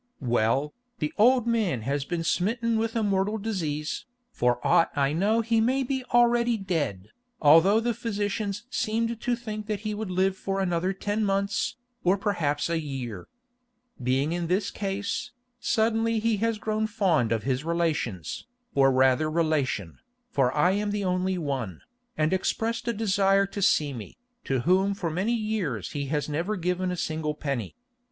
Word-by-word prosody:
"Well, 120 +4 +1 0.2
the 150 -5 -2
old 245 +2 +5
man 220 - +1
has 140 +3 -1
been 170 0 -2
smitten 225 +6 +1
with 225 +1 -1
a 225 - +1
mortal 200 +1 +1
disease. 165 - -3 0.2
For 125 - +1
aught 165 - +4
I 140 0 +2
know 210 +7 +2
he 230 0 +2
may 260 +4 +2
be 260 0 -2
already 240 -1 +3
dead, 145 - -2 0.3
although 165 +8 +6
the 235 +1 0
physicians 205 -1 -2
seemed 230 +1 -1
to 245 - +1
think 215 -2 -6
he 210 0 -2
would 210 -1 -4
live 185 +1 +1
for 195 0 -3
another 180 -1 0
ten 205 +3 -2
months, 200 0 0 0.3
or 185 +2 +3
perhaps 170 -8 0
a 165 -1 0
year. 130 - -5 0.7
Being 130 +5 +1
in 170 -1 -2
this 190 +3 0
case, 200 +3 -3 0.3
suddenly 225 0 +1
he 220 0 +1
has 225 +1 0
grown 215 +1 -1
fond 180 - +1
of 115 -2 0
his 130 +1 -1
relations, 155 - -2 0.3
or 135 -1 +5
rather 130 +4 +3
relation, 155 - 0 0.3
for 130 -3 +2
I 175 +5 +4
am 205 +2 0
the 205 0 -1
only 185 0 0
one, 135 - -3 0.4
and 155 +3 +2
expressed 225 +5 -1
a 235 - +1
desire 195 -2 +3
to 200 +1 -6
see 150 -6 +3
me, 115 -5 -9 0.3
to 135 -2 0
whom 190 +6 +2
for 170 -4 -3
many 195 +9 0
years 210 - -2
he 140 -1 -3
has 150 +1 -1
never 170 +8 -1
given 180 0 -1
a 180 - -3
single 155 -2 -2
penny. 140 -6 -3
190 Hz, 165 wpm, -27 LUFS, 150-215 Hz, 0.7 s, although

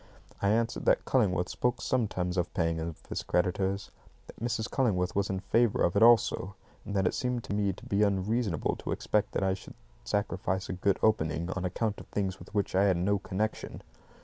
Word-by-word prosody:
I 100 - +2
answered 115 +2 0
that - - +3
Cullingworth 95 -8 +2
spoke 125 0 -1
sometimes 95 -8 -1
of 90 -1 -1
paying 85 -1 +1 0.3
his - - -2
creditors, 95 +2 0 0.3
that - - -14
Mrs. 115 -1 -1
Cullingworth 95 -10 0
was 100 0 +1
in 95 -1 -2
favour 115 +3 +2
of 85 - +2
it 100 - +3
also, 110 -4 +4 0.3
and 100 - -5
that 95 -1 +2
it - - +2
seemed 125 -3 -1
to - - -5
me 100 -1 +1
to - - -14
be 100 +1 +1
unreasonable 100 -2 +1
to - - -3
expect 105 -1 0
that - - 0
I 95 0 +2
should 95 - -9 0.3
sacrifice 95 -2 -1
a - - -2
good 95 +1 +1
opening 85 -5 +1
on 95 -1 -3
account 105 +3 -1
of - - -11
things 95 -2 -2
with - - -13
which 100 -2 0
I 95 +2 +4
had 95 -3 +3
no 100 +3 +1
connection. 105 +3 -3
100 Hz, 200 wpm, -30 LUFS, 95-110 Hz, 0.3 s, also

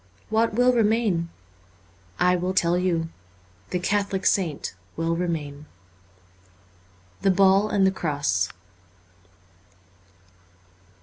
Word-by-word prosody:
What 220 0 +2
will 250 +1 +4
remain? 215 -7 +1 0.9
I 180 0 +4
will 180 +1 -2
tell 175 -1 +3
you: 175 -3 0 0.6
the - - -1
Catholic 200 +1 -1
saint 165 - 0 0.2
will 165 +1 0
remain. 155 -4 -4 0.7
' 90 0 -32
The 195 - +3
Ball 195 +2 +4
and 195 -2 +2
the 190 - +4
Cross.' 145 - -1
180 Hz, 100 wpm, -24 LUFS, 145-195 Hz, 0.9 s, will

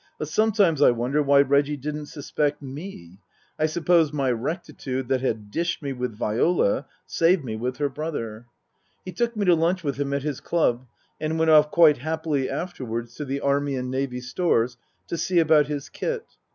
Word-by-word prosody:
But 155 - -4
sometimes 200 -4 +2
I - - +7
wonder 125 +5 0
why 140 -1 +5
Reggie 140 +1 +2
didn't 150 +2 -5
suspect 145 0 -2
me. 135 - -9 0.4
I 155 - +3
suppose 165 -1 +2
my 135 -4 0
rectitude 130 -1 -4
that 130 -1 +1
had 110 -5 -2
dished 170 +2 -2
me 140 -1 -2
with 125 -3 -4
Viola 110 - +1 0.2
saved 165 -2 +2
me 110 -3 -4
with 125 +3 -3
her 145 - +1
brother. 120 -6 -5 0.6
He 185 - -5
took 235 +5 -2
me 205 - 0
to 180 - +6
lunch 170 +2 +1
with 140 -3 -2
him 140 -1 -1
at 140 -1 -1
his 145 -3 -3
club, 130 -7 0 0.3
and 155 +1 -2
went 160 0 +3
off 150 -1 +6
quite 160 -3 +5
happily 155 -2 -1
afterwards 120 -9 -4
to 150 - -4
the 140 +1 -3
Army 140 0 +1
and 125 0 -3
Navy 130 -1 -2
Stores 125 -2 0 0.3
to 170 - -4
see 185 - 0
about 155 -3 +5
his 145 -1 -4
kit. 475 - -4
145 Hz, 185 wpm, -24 LUFS, 130-160 Hz, 0.6 s, I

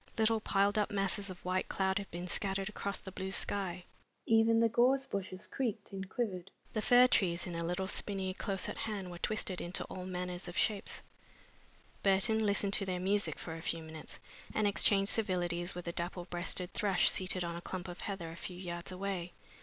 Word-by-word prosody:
Little 225 0 +4
piled 205 0 +2
up 210 - +1
masses 200 0 +1
of 180 -1 -9
white 185 +1 0
cloud 190 0 +1
had 200 - -7
been 175 +1 -5
scattered 195 +2 -1
across 200 -1 -3
the 190 - -8
blue 190 0 -4
sky. 190 -2 -1 0.4
Even 225 0 +5
the 230 - +5
gorse 255 +4 +4
bushes 190 -3 -4
creaked 240 -7 -3
and 190 -1 -5
quivered. 195 -7 -2 0.2
The 215 - 0
fir 245 +3 +7
trees 175 -8 +3
in 175 - -5
a 170 0 -2
little 180 +3 -1
spinney 190 -1 -1
close 195 0 -1
at - - -5
hand 200 -5 -3
were 175 - -8
twisted 205 -3 -1
into 175 +2 -2
all 185 -1 -6
manners 180 0 -3
of 175 - -6
shapes. 210 -2 0 1.0
Burton 200 +3 +3
listened 200 -1 +1
to 195 - +2
their 180 -1 -1
music 200 +3 +1
for 160 - -6
a 165 - -7
few 165 0 -2
minutes, 160 0 -8 0.4
and 215 - +3
exchanged 200 0 +4
civilities 175 -4 +1
with 180 -1 -6
a - - 0
dapple 175 +1 -3
breasted 180 +1 -1
thrush 195 -4 +4
seated 185 -1 +1
on 170 0 -3
a 170 - -5
clump 180 0 -5
of 175 0 -7
heather 185 -5 -4
a - - -8
few 175 +1 -7
yards 175 -1 -5
away. 185 -2 -3
190 Hz, 200 wpm, -34 LUFS, 180-205 Hz, 1.0 s, fir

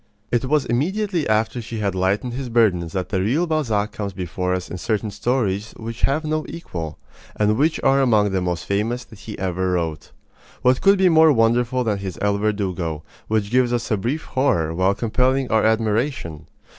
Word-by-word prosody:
It 120 +1 +1
was 145 +1 +1
immediately 175 - -1
after 110 +3 +1
she 115 0 -6
had 100 -3 -1
lightened 95 +6 0
his 130 0 -4
burdens 95 -8 +2
that 95 -1 -2
the 95 - 0
real 135 - +1
Balzac 115 -11 0
comes 100 -2 -5
before 90 0 -3
us 90 0 -4
in 90 - -5
certain 105 +2 -1
stories 105 -2 -1
which 115 +1 -7
have 155 +3 +1
no 155 0 -1
equal, 85 - -6 0.4
and 105 0 +2
which 155 +7 +1
are 135 +1 +4
among 105 -6 +3
the 95 -1 0
most 90 -2 -2
famous 110 +5 -1
that 110 -4 -16
he 105 -1 -8
ever 95 0 -1
wrote. 80 -3 -3 0.5
What 125 0 +3
could 200 0 +5
be 190 0 +4
more 160 -1 +6
wonderful 120 +1 +2
than 105 -4 -1
his 95 -2 -5
El 100 0 +1
Verdugo, 95 -7 -2 0.2
which 105 -1 0
gives 125 -1 +3
us 120 -1 -2
a - - +4
brief 130 +11 -2
horror 85 - 0
while 95 +3 +2
compelling 125 +4 0
our 110 0 +3
admiration? 110 - 0
110 Hz, 190 wpm, -22 LUFS, 95-130 Hz, 0.5 s, more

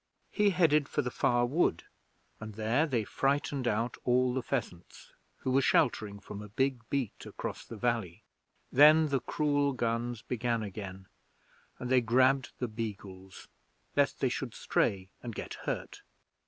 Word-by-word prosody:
He 210 -1 +3
headed 160 -6 +3
for - - -1
Far 120 0 +2
Wood, 130 - +1 0.6
and 110 -1 -8
there 115 +9 +1
they 120 -6 0
frightened 135 +2 0
out 115 +2 0
all 125 0 +2
the 130 - -1
pheasants, 110 -10 -5 0.2
who 130 - -3
were 135 +2 +4
sheltering 105 -5 +2
from 105 0 -8
a 105 - -9
big 130 +4 0
beat 135 -6 -2
across - - -6
the 115 - -9
valley. 115 -7 -1 0.5
Then 155 +3 +7
the 135 -1 +1
cruel 145 +1 +1
guns 120 -1 -2
began 120 -2 -1
again, 95 -2 -7 0.7
and 125 - -5
they 130 -1 +5
grabbed 130 +3 +3
the 125 - -2
beagles 100 -4 -7 0.5
lest - - +2
they - - +3
should - - -4
stray 95 -1 0
and 120 -3 -6
get - - -5 0.2
hurt. - - -4
120 Hz, 150 wpm, -31 LUFS, 110-135 Hz, 0.7 s, Then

